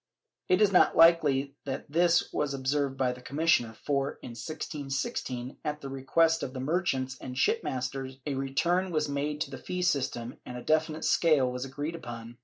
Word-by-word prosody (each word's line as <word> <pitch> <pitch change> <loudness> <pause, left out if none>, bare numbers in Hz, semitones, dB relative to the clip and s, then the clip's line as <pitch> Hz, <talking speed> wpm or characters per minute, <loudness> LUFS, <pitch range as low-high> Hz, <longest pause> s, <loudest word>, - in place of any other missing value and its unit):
It 185 +3 +5
is 205 - +4
not 180 - +4
likely 150 -5 +5
that 135 -2 -4
this 170 +2 +2
was 145 -2 -1
observed 135 0 -1
by 130 -2 +1
the 125 0 -9
commissioner 130 -4 +1
for, 140 -1 0
in - - -6
1616, 135 -2 -4
at 150 0 -3
the 135 - -6
request 160 +5 +2
of 130 - -4
the - - -3
merchants 135 -3 -1
and 125 -1 -6
shipmasters, 130 0 -1
a 145 - -1
return 170 +8 0
was 155 -3 0
made 145 +1 -2
to 140 - -2
the - - -7
fee 180 0 -3
system 130 -7 -1
and 125 - -7
a 120 - -8
definite 155 0 +1
scale 150 -7 +3
was 125 +1 -4
agreed 145 +4 -4
upon. 120 -6 -8
140 Hz, 180 wpm, -29 LUFS, 130-155 Hz, -, It